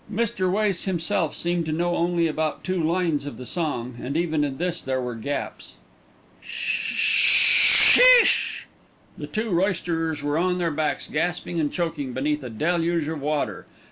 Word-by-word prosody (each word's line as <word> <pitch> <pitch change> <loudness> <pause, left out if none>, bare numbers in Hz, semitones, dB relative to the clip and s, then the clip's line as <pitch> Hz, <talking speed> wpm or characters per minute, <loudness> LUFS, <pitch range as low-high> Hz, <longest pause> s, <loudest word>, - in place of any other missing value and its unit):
Mr. 205 -4 -1
Wace 200 -3 -1
himself 180 -2 -2
seemed 175 0 -2
to 160 - -5
know 175 +2 -1
only 170 0 0
about 155 -1 -3
two 185 -2 -2
lines 165 -3 -1
of 145 - -8
the 125 - -9
song, 125 -7 -4
and 140 +5 -4
even 160 -3 -1
in 135 -2 -4
this 175 0 -3
there 130 0 -3
were 125 -1 -4
gaps. 140 +5 -6 0.7
"Shisssssssssssh!" - - +5 0.6
The - - -7
two 220 0 -4
roysterers 165 -4 -2
were 145 +2 -1
on 180 +1 0
their 170 -2 -1
backs 150 -1 -2
gasping 175 +1 -3
and 150 -2 -1
choking 160 -7 -4
beneath 150 +3 -2
a 125 - -7
deluge 165 +5 -1
of 160 -3 -6
water. 150 0 -3
165 Hz, 155 wpm, -23 LUFS, 145-175 Hz, 0.7 s, Shisssssssssssh